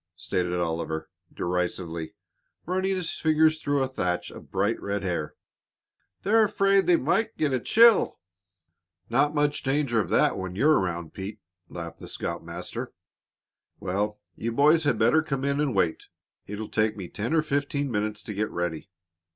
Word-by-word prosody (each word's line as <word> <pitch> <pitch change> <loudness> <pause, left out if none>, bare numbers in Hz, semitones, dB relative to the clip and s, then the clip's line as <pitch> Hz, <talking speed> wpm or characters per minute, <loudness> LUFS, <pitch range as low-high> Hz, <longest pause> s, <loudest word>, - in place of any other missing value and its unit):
stated 90 -1 -1
Oliver, 80 -2 -2 0.2
derisively, 85 -2 -3 0.5
running 190 +2 0
his 180 -3 -2
fingers 155 0 +3
through 145 -1 +1
a - - 0
thatch 90 -9 -2
of - - -12
bright, 100 +4 0
red 100 0 -2
hair. 85 -5 -2 0.9
"They're 220 +3 +5
afraid 195 -1 +3
they 175 - +6
might 190 - 0
get 150 -3 +1
a 130 - +2
chill." 230 - +5 0.9
"Not 145 +5 +2
much 145 0 +1
danger 135 -4 +1
of - - -5
that - - +3
when 95 -1 -5
you're 150 +9 +4
around, 85 -3 -3
Pete," 100 +2 -6 0.3
laughed 85 -1 -7
the - - -9
scoutmaster. - - -5 0.9
"Well, 105 +3 -2 0.2
you 115 - -3
boys 150 +6 +4
had 125 - +2
better 120 +8 +4
come 135 -3 -3
in 140 +1 +1
and 140 -7 0
wait. 85 -4 0 0.4
It'll 105 +2 -5
take 110 0 +1
me 95 -3 -6
ten 110 - -2
or 155 - +3
fifteen 140 -1 -1
minutes 105 0 -2
to 105 - -6
get 105 +2 -1
ready." 85 +1 -3
115 Hz, 160 wpm, -26 LUFS, 95-150 Hz, 0.9 s, they